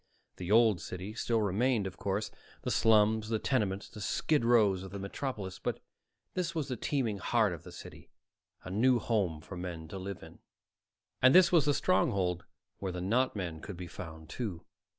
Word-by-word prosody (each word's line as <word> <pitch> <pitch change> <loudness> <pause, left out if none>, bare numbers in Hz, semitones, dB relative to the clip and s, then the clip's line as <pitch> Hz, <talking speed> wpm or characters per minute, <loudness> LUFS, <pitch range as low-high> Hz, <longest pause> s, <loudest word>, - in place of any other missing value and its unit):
The 90 -1 -6
Old 110 -5 +5
City 95 +5 -6
still 115 0 0
remained, 105 +2 +1
of 95 -2 -5
course 100 +2 -2 0.3
the - - -1
slums, 110 0 +4
the 115 - +1
tenements, 105 -5 -1
the 105 - -10
skid 145 +7 +1
rows 110 -6 +4
of 95 - -7
the 100 - -6
metropolis 100 -1 -5
but - - -2 0.5
this 175 -2 -2
was 150 -4 -2
the 125 - -1
teeming 115 -4 -1
heart 110 -2 +2
of 85 - -8
the - - -11
city, - - -11 0.5
a 95 - -7
new 125 +6 +4
home 100 -9 0
for 95 - -9
men 85 -2 -6
to 95 - -6
live 95 0 -6
in. - - -13 0.8
And 130 +1 +6
this 185 -1 +7
was 165 -5 +5
the 145 -1 +3
stronghold 90 - +1 0.3
where 95 -2 -3
the 90 - -5
not 115 +9 +1
men 85 -5 -4
could 100 -5 -7
be 90 - -6
found, 80 -3 -9
too. 100 -7 -5
105 Hz, 190 wpm, -31 LUFS, 95-120 Hz, 0.8 s, this